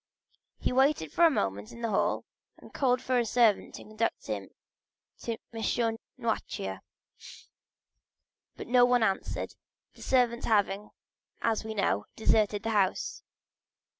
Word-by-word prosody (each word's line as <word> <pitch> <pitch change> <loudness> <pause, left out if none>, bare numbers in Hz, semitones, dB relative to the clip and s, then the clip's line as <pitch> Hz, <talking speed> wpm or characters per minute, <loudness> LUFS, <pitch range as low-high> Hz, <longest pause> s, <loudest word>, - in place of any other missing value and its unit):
He - - -1
waited 265 - +2
for 340 - +5
a - - +7
moment 100 - -2
in 235 - -10
the 230 - 0
hall 195 - +1 0.3
and - - -15
called 255 -2 +1
for 255 -1 +2
a - - +2
servant 225 -2 +2
to - - -9
conduct 215 +2 -2
him 105 -3 -4 0.7
to 230 -1 -3 0.2
M. 225 0 0 0.2
Noirtier; - - -3 1.8
but - - -7
no 245 +1 +5
one 245 -1 +4
answered, 195 -3 -1 0.4
the - - -17
servants 245 -2 +2
having, 205 -1 +1 0.5
as 225 -1 +1
we 220 0 -5
know, 105 - 0
deserted 210 -2 +2
the 225 - -1
house. 200 -3 0
225 Hz, 135 wpm, -29 LUFS, 200-245 Hz, 1.8 s, a